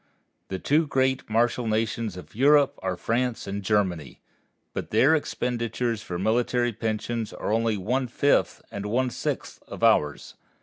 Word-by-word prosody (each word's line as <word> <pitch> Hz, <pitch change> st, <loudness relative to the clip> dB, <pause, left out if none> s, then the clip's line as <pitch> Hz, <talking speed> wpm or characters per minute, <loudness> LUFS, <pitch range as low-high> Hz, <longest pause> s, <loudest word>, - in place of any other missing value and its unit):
The 95 Hz, -, -3 dB
two 150 Hz, -, +2 dB
great 130 Hz, -2 st, 0 dB
martial 120 Hz, +2 st, +1 dB
nations 110 Hz, -2 st, -1 dB
of 90 Hz, -, -11 dB
Europe 140 Hz, +3 st, +4 dB
are 95 Hz, -1 st, -2 dB
France 120 Hz, +3 st, -1 dB
and 100 Hz, +1 st, -4 dB
Germany, 95 Hz, -, -1 dB, 0.5 s
but -, -, -4 dB
their 130 Hz, +8 st, +4 dB
expenditures 120 Hz, -6 st, -1 dB
for 90 Hz, -5 st, -5 dB
military 120 Hz, +4 st, +1 dB
pensions 110 Hz, +1 st, -3 dB
are 105 Hz, -, -2 dB
only 115 Hz, -1 st, +1 dB
one 125 Hz, +7 st, -1 dB
fifth 140 Hz, +4 st, +1 dB
and 100 Hz, 0 st, -5 dB
one 125 Hz, +4 st, 0 dB
sixth -, -, -4 dB
of -, -, -8 dB
ours. 75 Hz, -1 st, +2 dB
115 Hz, 145 wpm, -26 LUFS, 105-125 Hz, 0.5 s, Europe